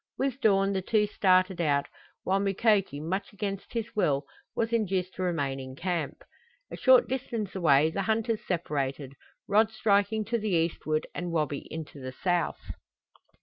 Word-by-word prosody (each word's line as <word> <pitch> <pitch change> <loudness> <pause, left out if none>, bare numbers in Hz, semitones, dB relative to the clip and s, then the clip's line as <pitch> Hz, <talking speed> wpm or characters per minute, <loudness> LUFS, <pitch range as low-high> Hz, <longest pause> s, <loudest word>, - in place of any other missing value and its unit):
With 270 0 -1
dawn 195 -3 +3
the 190 - 0
two 210 +3 +2
started 185 -3 +2
out, 145 -3 +2 0.4
while 195 +1 +1
Mukoki, 195 -5 +2
much 185 +6 -3
against 200 -1 -5
his 230 -2 -4
will, 140 -9 +1 0.3
was 230 0 -1
induced 190 -5 0
to - - -6
remain 145 -7 -1
in 130 0 -8
camp. 170 -2 -3 0.5
A - - -5
short - - +5
distance 235 -6 -3
away 155 -4 +4
the 195 - -2
hunters 220 +2 0
separated, 140 -5 -2 0.3
Rod 215 +2 +4
striking 215 0 +1
to 235 +2 -1
the 215 0 -2
eastward 160 -2 0
and 175 -1 -4
Wabi 150 -3 -1
into 155 -2 -7
the 130 0 -6
south. 175 -3 0
190 Hz, 155 wpm, -28 LUFS, 155-215 Hz, 0.5 s, short